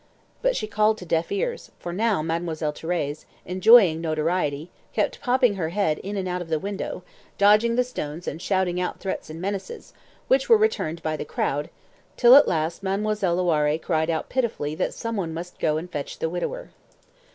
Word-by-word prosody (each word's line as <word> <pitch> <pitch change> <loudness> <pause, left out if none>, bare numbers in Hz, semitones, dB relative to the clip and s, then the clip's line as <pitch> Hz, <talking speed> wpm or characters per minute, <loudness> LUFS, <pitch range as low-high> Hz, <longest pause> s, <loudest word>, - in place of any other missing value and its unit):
But - - +2
she - - -2
called 215 +1 +2
to 180 - -9
deaf 165 0 0
ears, 480 +4 -2
for 175 - -6
now 210 -4 +1
Mademoiselle 160 -2 -2
Thérèse, 155 -2 -3 0.2
enjoying 185 -3 +6
notoriety, 155 -1 -1 0.2
kept - - -1
popping 250 -5 +2
her 160 -4 -1
head 170 -4 0
in 200 +1 -5
and 190 -1 -2
out 180 0 -2
of 170 - -8
the 160 - +1
window, 200 +5 -5 0.3
dodging 210 +3 +5
the 250 - +3
stones 170 -9 -6
and 160 - -4
shouting 185 -2 0
out 180 - -3
threats 190 - -4
and 160 +1 -7
menaces, 200 - -5 0.3
which 265 +1 +2
were 455 - +8
returned 300 - 0
by 155 0 -1
the - - -4
crowd, 145 0 -2 0.5
till 245 +1 +8
at 285 - +8
last 165 +1 -1
Mademoiselle 195 -2 0
Loiré 155 -4 +2
cried 160 -1 0
out 160 -1 -1
pitifully 230 - -1
that 155 - -2
some 230 0 -4
one 165 -4 -3
must 175 +2 -7
go 155 -1 +1
and 175 +3 -6
fetch 145 -3 -5
the 160 - -2
widower. - - -4
180 Hz, 185 wpm, -24 LUFS, 160-215 Hz, 0.5 s, were